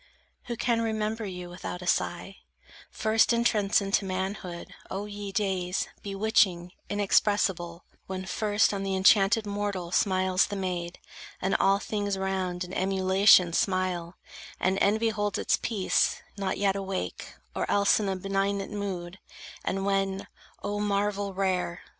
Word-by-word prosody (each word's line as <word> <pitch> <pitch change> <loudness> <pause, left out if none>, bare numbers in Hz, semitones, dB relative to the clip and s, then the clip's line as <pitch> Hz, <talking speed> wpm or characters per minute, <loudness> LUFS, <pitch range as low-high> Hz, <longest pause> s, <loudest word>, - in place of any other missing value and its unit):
Who 235 - -4
can 235 -1 +1
remember 220 0 -1
you 180 -1 -6
without 180 0 -6
a - - -7
sigh, 175 +2 -1 0.5
First 220 +2 +2
entrance 215 -4 +2
into 195 +1 +1
manhood, 185 -2 -4 0.2
O 195 +2 -4
ye 205 -1 -6
days 190 -2 -1
Bewitching, 195 -3 +1 0.2
inexpressible, 195 -4 +1 0.2
when 190 0 -4
first 210 +1 +1
On 200 - -2
the 195 -1 -1
enchanted 195 +3 +4
mortal 200 -4 -3
smiles 185 0 +2
the 205 - -5
maid, 180 -2 -3 0.4
And 190 +1 0
all 195 0 +4
things 205 -1 -2
round 190 -2 -2
in 180 +1 -8
emulation 190 -1 +4
smile; 185 -2 0 0.4
And 190 +1 +1
envy 220 +3 +3
holds 205 -2 -1
its - - +1
peace, 205 -5 +1
not 195 -2 -2
yet 195 -1 +2
awake, 195 - -4 0.2
Or - - -2
else 200 +1 +4
in 205 -2 -1
a 190 - -1
benignant 195 +1 -1
mood; 190 -3 -5 0.4
and 195 +1 -2
when, 195 -1 0 0.4
—O 205 0 -2
marvel 205 -1 -1
rare! 185 -2 -1
195 Hz, 140 wpm, -28 LUFS, 185-205 Hz, 0.5 s, enchanted